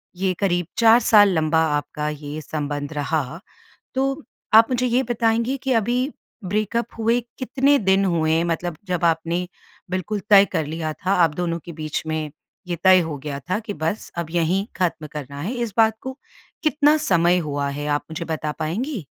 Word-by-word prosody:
ये 185 0 0
करीब 175 -3 +1
4 230 +1 +6
साल 205 -2 +6
लंबा 160 0 +2 0.2
आपका 150 +1 -4
ये 150 0 -6
संबंध 145 -1 -4
रहा। 150 +1 -2 0.6
तो 270 +3 -1 0.3
आप 225 +1 +7
मुझे 250 0 +1
ये 245 +2 +2
बताएँगी 230 +2 0
कि 270 - -1
अभी 235 +2 +1 0.5
ब्रेकअप 215 +4 -1
हुए 230 +2 +2 0.2
कितने 275 +2 +2
दिन 190 -1 +3
हुए? 165 -2 +2
मतलब 170 -1 -2
जब 175 -1 0
आपने 165 +2 0 0.4
बिल्कुल 185 +3 -2
तय 200 -1 +8
कर 160 -4 0
लिया 160 0 -3
था, 185 +4 -3
आप 165 -5 +3
दोनों 170 -1 -2
के 170 - -7
बीच 155 -1 -3
में 155 -2 -2 0.4
ये 175 - -2
तय 185 -1 +7
हो 155 -3 -4
गया 145 -2 -4
था 195 +4 +1
कि 205 - -4
बस 165 +5 -3
अब 170 -2 -2
यहीं 175 +4 +1
खत्म 170 -4 -1
करना 140 -1 -7
है, 200 - -3
इस 235 -4 -3
बात 220 -1 +4
को 260 0 -6 0.5
कितना 300 -1 +4
समय 180 - +3
हुआ 140 0 -1
है 145 +1 -4
आप 145 0 0
मुझे 165 +1 -4
बता 155 -2 -3
पाएँगी? 205 - -3
175 Hz, 180 wpm, -22 LUFS, 155-225 Hz, 0.6 s, तय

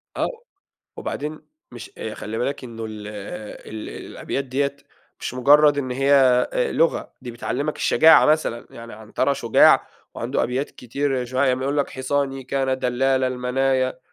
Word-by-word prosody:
آه، - - 0 0.7
وبعدين 150 +1 -5 0.3
مش - - -9 0.2
خلّي 110 +1 -5
بالك 140 +1 -2
إنه 115 -2 -7
ال 110 -1 -7
ال 105 +1 -8 0.2
الأبيات 140 - -4
ديّة 140 +2 -1 0.4
مش - - -4
مجرد 145 +3 +5
إن 130 -2 -2
هي 135 +3 +1 0.4
آآ، - - 0
لغة، 165 - +1
دي 125 - -6
بتعلّمك 140 +5 -3
الشجاعة 160 0 +6
مثلًا 150 -6 +1
يعني. 115 0 -10
عنترة 110 +5 -1
شجاع 120 -4 +4 0.3
وعنده - - -1
أبيات 130 +4 -2
كتير 130 +1 -2
شو 130 +1 -5
ع 140 - +4
يقول 130 +2 0
لك: 140 - 0
"حصاني 135 0 -2
كان 130 0 -1
دلال 130 +1 +1
المنايا"، 130 +1 0
130 Hz, 145 wpm, -22 LUFS, 125-140 Hz, 0.7 s, الشجاعة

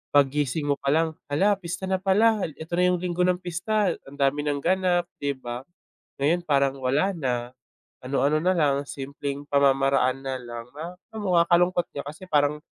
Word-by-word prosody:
paggising 145 +1 +2
mo 145 - +2
palang, 160 +4 +1 0.2
hala 195 +9 +3
pista 175 0 -6
na 190 0 0
pala 210 +3 +4 0.2
eto 160 +2 -9
na 180 - +4
yung 180 - +2
linggo 180 0 -1
ng 180 - +3
pista, 180 +3 0 0.2
ang 135 - -11
dami 140 +1 +2
nang 145 -1 -1
ganap 185 -2 +2 0.2
di 140 -1 -1
ba. 120 -1 -6 0.6
Ngayon, 170 +5 +2
parang 140 -2 +2
wala 135 +8 +1
na, 125 -6 -2 0.6
ano-ano 140 +3 +2
na 185 - +3
lang, 145 -4 +2
simpleng 140 +1 -5
pamamaraan 135 -2 +3
na 135 -1 -3
lang 120 -1 -8
no? 170 +3 -6 0.2
Um, 205 -4 -2
nakakalungkot 175 +1 +3
nga 140 - -3
kasi 155 +6 -9
parang 150 -1 +2
150 Hz, 170 wpm, -25 LUFS, 140-180 Hz, 0.6 s, pala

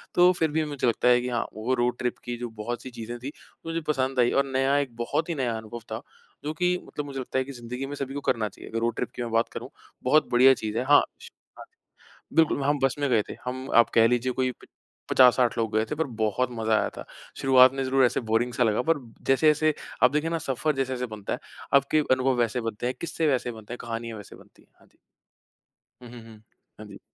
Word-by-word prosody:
तो 180 +1 +6
फिर 160 -2 +1
भी 155 +1 +1
मुझे 145 -4 -2
लगता 115 +1 +1
है 125 0 +5
कि 125 - -3
हाँ, 120 -2 -1
वो 110 +4 -2
रोड 120 0 0
ट्रिप 125 -1 -2
की 120 -1 -4
जो 120 -1 -5
बहुत 120 +3 -4
सी 130 - -7
चीज़ें 120 +1 -7
थी, 135 +4 -6 0.3
मुझे 165 0 -2
पसंद 130 -3 0
आई 120 -1 +4
और 140 0 +2
नया 135 +1 +1
एक 135 -5 -2
बहुत 120 +8 -2
ही 170 - -1
नया 120 -4 -1
अनुभव 110 +1 -8
था, 110 - -4 0.4
जो 150 +1 -3
कि 180 +2 +1
मतलब 150 - -6
मुझे 135 -1 -6
लगता 130 0 -4
है - - +1
कि 140 - -8
ज़िन्दगी 125 +1 -6
में 145 +1 -6
सभी 135 -1 -5
को 145 - -4
करना 110 -6 0
चाहिए। - - -12
अगर 115 - -2
रोड 115 0 -1
ट्रिप 125 - -3
की - - -5
मैं 115 - -5
बात 115 +1 +1
करूँ - - -6 0.3
बहुत 150 +5 +3
बढ़िया 130 +2 +7
चीज़ 110 -2 -4
है 125 - +1
हाँ, 145 +1 +7 0.2
श - - -10 0.3
हाँ, - - -9 0.7
बिल्कुल, 160 -3 +3
हम 145 +1 +1
बस 135 -1 +3
में 145 - +1
गए 110 -3 +3
थे। - - -7
हम 130 +1 -5
आप 120 0 +6
कह 115 0 +6
लीजिए 125 +1 +1
कोई 130 0 0
प - - -19 0.4
50-60 125 -2 +5
लोग 115 -2 -1
गए 110 - +3
थे - - -1
पर 160 -1 0
बहुत 110 +4 +1
मजा 110 -1 0
आया - - 0
था। - - -7 0.4
शुरुआत 130 -1 +6
में 135 - -2
ज़रूर 130 0 +3
ऐसे - - -1
बोरिंग 120 +2 +1
सा 125 - +1
लगा 110 +1 +1
पर 165 - +3 0.3
जैसे-जैसे 155 +3 +3 0.3
आप 125 - +7
देखे 150 +2 0
ना 165 0 -1
सफर 150 +4 0
जैसे-जैसे 130 -2 -2
बनता 100 - -5
है, - - -2 0.4
आपके 140 +3 +4
अनुभव 130 0 +2
वैसे 120 +1 0
बनते 115 0 -4
हैं, 125 - -1
किस्से 165 -1 -1
वैसे 125 -3 0
बनते 110 0 -11
हैं, 125 - -6
कहानियाँ 115 -1 -5
वैसे 100 - -12
बनती - - -20
हैं, - - -30
हाँ - - -22
जी। - - -33 1.0
हुँ, 120 - -11
हुँ, 120 -1 -10
हुँ, 110 -2 -14 0.4
हाँ 110 - -9
जी। 100 - -12
125 Hz, 250 wpm, -26 LUFS, 115-140 Hz, 1.0 s, बढ़िया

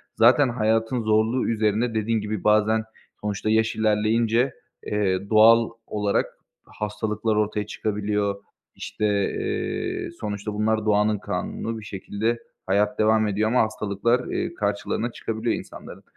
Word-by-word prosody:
Zaten 125 +4 +5
hayatın 115 +1 0
zorluğu 110 +3 +2
üzerine 110 +1 +1
dediğin 110 0 0
gibi 105 -1 -4
bazen 110 +1 +3 0.4
sonuçta 105 0 -2
yaş 110 +1 +2
ilerleyince, 110 +3 +2 0.3
eee, 100 -2 -1
doğal 115 +1 +6 0.2
olarak 105 -1 0 0.4
hastalıklar 105 +1 -2
ortaya 105 0 0
çıkabiliyor. 105 -1 -2 0.3
İşte, 105 - -4 0.3
eee, - - -3
sonuçta 105 0 -4
bunlar 110 +1 0
doğanın 105 0 +3
kanunu 105 +3 -4
bir 105 - -11
şekilde 105 +4 -2 0.3
hayat 100 +2 +1
devam 110 0 +3
ediyor 105 +2 0
ama 125 +2 +3
hastalıklar, 110 +3 0
eee, - - -2
karşılarına 105 0 -2
çıkabiliyor 115 0 -2
insanların. - - -10
110 Hz, 125 wpm, -24 LUFS, 105-115 Hz, 0.4 s, doğal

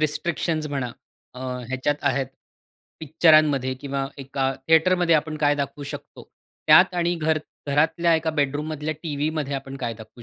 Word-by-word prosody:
Restrictions 155 +1 -1
म्हणा 130 -4 -3 0.4
अ, 125 - -9 0.3
ह्याच्यात 130 +3 0
आहेत 135 -1 -1 0.7
पिक्चरांमध्ये 155 -4 +3
किंवा 140 -1 -3
एका 135 0 -2 0.2
थिएटरमध्ये 170 +1 +4
आपण 155 0 0
काय 145 -1 +3
दाखवू 140 0 -4
शकतो? 145 - -9 0.4
त्यात 180 +4 +7
आणि 175 0 +1
घर 160 -1 +1 0.3
घरातल्या 165 +4 +2
एका 160 0 0
बेडरूममधल्या 150 +1 -2
टीव्हीमध्ये 150 -2 -2
आपण 135 0 -6
काय 120 -3 -3
दाखवू 110 +2 -13
150 Hz, 135 wpm, -24 LUFS, 135-160 Hz, 0.7 s, त्यात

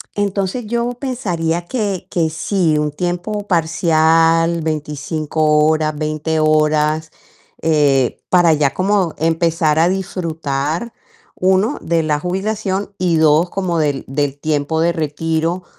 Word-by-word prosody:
entonces 200 +3 -2
yo 235 +2 -1
pensaría 175 - -2
que 205 -7 -3
que 165 -2 +1
sí, 160 0 0
un 150 0 0
tiempo 180 +6 -3
parcial, 165 -1 +2
25 155 0 -3 0.3
horas, 155 -1 +1
20 155 +1 -2
horas, 155 0 +2 0.5
eh, 145 -5 +2
para 175 -2 +5
ya 145 -3 +1
como 190 -1 +1
empezar 160 -1 +1
a 165 - +4
disfrutar, 165 -1 -2 0.5
1 190 +8 +2
de 165 0 0
la 150 -1 0
jubilación 195 +3 -2
y 180 -2 +1
2 160 +2 +3
como 180 -4 -1
del 145 -3 0
del 140 0 -2
tiempo 155 +1 -1
de 170 +1 +3
retiro, 165 +2 -2
165 Hz, 120 wpm, -18 LUFS, 155-185 Hz, 0.5 s, para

